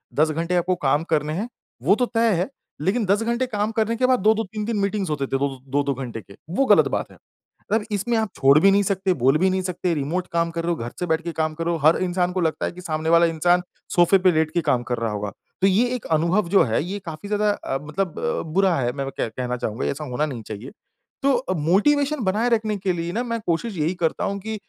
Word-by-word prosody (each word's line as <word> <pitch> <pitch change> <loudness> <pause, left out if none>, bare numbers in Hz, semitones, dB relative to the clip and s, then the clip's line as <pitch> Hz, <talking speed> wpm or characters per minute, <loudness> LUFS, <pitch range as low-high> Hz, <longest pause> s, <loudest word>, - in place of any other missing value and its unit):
10 155 +2 +3
घंटे 165 +3 -1
आपको 180 +1 +1
काम 145 +4 +3
करने 150 0 +1
हैं 210 +9 -3 0.3
वो 185 +9 +5
तो 250 +2 +1
तय 230 -1 +1
है। 195 - -2 0.3
लेकिन 205 +6 +1
10 200 +3 +2
घंटे 235 +2 0
काम 210 -2 -1
करने 225 +1 0
के 255 +2 +1
बाद 255 -1 +3
2-2 220 +3 +3
3-3 215 +2 -3
मीटिंग्स 200 -2 -1
होते 140 -3 -1
थे 135 - -2
वो 140 - +1 0.2
2-2 140 0 +1
घंटे 120 -4 -6
के, 100 0 -16
वो 270 +10 +1
गलत - - +6
बात - - -3
है। - - -16 0.5
मगर 220 0 +2
इसमें 225 +3 0
आप 220 -2 0
छोड़ 135 +1 +5
भी 195 +5 +5
नहीं 200 +1 +3
सकते, 190 -1 0
बोल 135 +1 +3
भी 190 +4 +3
नहीं 190 0 0
सकते, 180 -1 -1
रिमोट 165 +5 -2
काम 170 0 +1
कर 165 0 -3
रहे 175 - 0
हो, - - +1
घर 120 +1 -5
से 180 - -1
बैठ 160 0 +1
के 170 - -3
काम 155 -1 -1
कर 165 +1 -4
रहे 170 - +1
हो, 165 - -4
हर 160 - +6
इंसान 180 0 0
को 185 - -1
लगता 160 -1 0
है - - -2
कि 180 +1 -11
सामने 155 -1 -2
वाला 170 +1 +6
इंसान 175 +2 +2 0.3
सोफे 175 +2 +5
पे 185 - +7
लेट 155 -1 +1
के 175 - +1
काम 125 -6 +1
कर 120 - +1
रहा 115 -1 -2
होगा। 105 -1 -3 0.3
तो 195 - +5
ये 210 +6 +3
एक 245 - -7
अनुभव 170 +3 +1
जो 195 +1 +5
है, 115 +3 0
ये 195 +4 -4
काफ़ी 160 +4 -7
ज़्यादा 210 0 +1
अ, 135 -8 -3
मतलब 160 +4 -3
अ, - - -1
बुरा 190 -2 +3
है, 125 -4 0
मैं 140 -1 -3
वो 135 - -5
कह - - 0
कहना 125 +2 -3
चाहूँगा, 110 -2 -3
ऐसा 145 +2 -2
होना 130 +3 -1
नहीं 130 -7 -5
चाहिए। 110 +5 -7 0.5
तो 275 0 +4
अ, 240 -6 -2
मोटिवेशन 270 - +2
बनाए 210 +5 +1
रखने 215 -3 +1
के 185 -1 -1
लिए 170 0 -3
ना 235 - -1
मैं 230 -1 -3
कोशिश 180 +4 -1
यही 155 +4 0
करता 160 - 0
हूँ 200 0 -2
कि 220 +2 -5
180 Hz, 265 wpm, -23 LUFS, 155-210 Hz, 0.5 s, पे